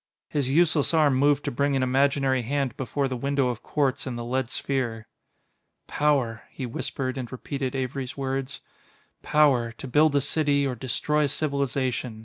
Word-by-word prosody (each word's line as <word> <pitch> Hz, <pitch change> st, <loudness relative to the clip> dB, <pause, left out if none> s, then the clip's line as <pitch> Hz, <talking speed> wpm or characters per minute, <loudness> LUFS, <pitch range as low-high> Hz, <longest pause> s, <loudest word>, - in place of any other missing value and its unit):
His 140 Hz, -3 st, 0 dB
useless 160 Hz, +1 st, +3 dB
arm 150 Hz, -3 st, +4 dB
moved 145 Hz, +2 st, +2 dB
to -, -, -1 dB
bring 140 Hz, +3 st, +1 dB
an 135 Hz, -, +1 dB
imaginary 135 Hz, 0 st, +2 dB
hand 135 Hz, 0 st, -1 dB
before 135 Hz, +2 st, -1 dB
the 130 Hz, -, -3 dB
window 140 Hz, +1 st, 0 dB
of 120 Hz, -2 st, -4 dB
quartz 140 Hz, -2 st, -1 dB
in 125 Hz, -, -3 dB
the 120 Hz, 0 st, -5 dB
lead 130 Hz, 0 st, -1 dB
sphere. 130 Hz, -6 st, -2 dB, 0.8 s
"Power," 135 Hz, -6 st, +1 dB
he 130 Hz, -, -6 dB
whispered 130 Hz, +2 st, -3 dB
and 125 Hz, -2 st, -6 dB
repeated 130 Hz, +1 st, -4 dB
Avery's 130 Hz, 0 st, -3 dB
words; 135 Hz, 0 st, -3 dB, 0.6 s
"power, 135 Hz, -6 st, +3 dB
to 135 Hz, -, -8 dB
build 150 Hz, +3 st, +3 dB
a 140 Hz, -, +4 dB
city 140 Hz, -1 st, +1 dB
or 135 Hz, -, -1 dB
destroy 145 Hz, +5 st, 0 dB
a -, -, -1 dB
civilization... 135 Hz, -5 st, -1 dB
135 Hz, 165 wpm, -26 LUFS, 125-145 Hz, 0.8 s, arm